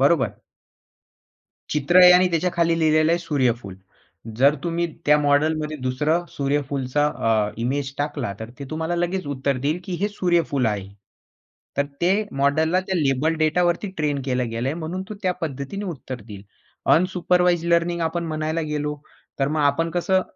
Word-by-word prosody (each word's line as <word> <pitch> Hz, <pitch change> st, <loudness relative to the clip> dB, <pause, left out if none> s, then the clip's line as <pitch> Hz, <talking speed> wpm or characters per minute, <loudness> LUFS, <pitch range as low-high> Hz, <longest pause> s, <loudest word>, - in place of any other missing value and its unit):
बरोबर 140 Hz, +1 st, +2 dB, 1.3 s
चित्र 150 Hz, +4 st, +2 dB
आहे 180 Hz, 0 st, +10 dB
आणि 180 Hz, +1 st, +5 dB
त्याच्या 170 Hz, +2 st, +1 dB
खाली 170 Hz, -1 st, +2 dB
लिहिलेलं 155 Hz, 0 st, +3 dB
आहे 170 Hz, -, +2 dB
सूर्यफूल. 125 Hz, -, -1 dB, 0.6 s
जर 140 Hz, +3 st, +5 dB
तुम्ही 170 Hz, 0 st, 0 dB, 0.2 s
त्या 150 Hz, 0 st, +6 dB
मॉडेलमध्ये 150 Hz, +1 st, +1 dB
दुसरं 150 Hz, +6 st, 0 dB
सूर्यफूलचा 140 Hz, 0 st, -1 dB
अ, 110 Hz, -6 st, 0 dB
इमेज 135 Hz, +3 st, -2 dB
टाकला, 145 Hz, -7 st, -2 dB
तर 110 Hz, +1 st, -7 dB
ते 140 Hz, -, -6 dB
तुम्हाला 160 Hz, +2 st, -2 dB
लगेच 175 Hz, +1 st, -1 dB
उत्तर 140 Hz, -1 st, -1 dB
देईल, 155 Hz, +4 st, 0 dB
की 185 Hz, -2 st, -5 dB
हे 205 Hz, -, +2 dB
सूर्यफूल 170 Hz, -, +1 dB
आहे. 105 Hz, -3 st, -1 dB, 0.9 s
तर 140 Hz, -, +2 dB, 0.2 s
ते 175 Hz, +2 st, +3 dB, 0.2 s
मॉडेलला 155 Hz, +6 st, +2 dB
त्या 190 Hz, -, -1 dB
लेबल 145 Hz, +2 st, +1 dB
डेटावरती 175 Hz, +4 st, +1 dB
ट्रेन 145 Hz, -3 st, 0 dB
केलं 125 Hz, -2 st, -1 dB
गेलं 115 Hz, +5 st, -2 dB
म्हणून 170 Hz, +3 st, -4 dB
तो -, -, -4 dB
त्या 185 Hz, -1 st, +2 dB
पद्धतीने 155 Hz, +6 st, -4 dB
उत्तर 135 Hz, -, -6 dB
देईल. 105 Hz, -2 st, -11 dB, 0.5 s
अनसुपरवाइज्ड 180 Hz, -1 st, +2 dB
लर्निंग 170 Hz, 0 st, +1 dB
आपण 165 Hz, +1 st, -1 dB
म्हणायला 155 Hz, +1 st, -2 dB
गेलो, 150 Hz, 0 st, -2 dB, 0.4 s
तर 135 Hz, -, +2 dB
मग 155 Hz, +1 st, -1 dB
आपण 145 Hz, +4 st, +2 dB
कसं 185 Hz, +2 st, +1 dB
155 Hz, 155 wpm, -23 LUFS, 140-170 Hz, 1.3 s, आहे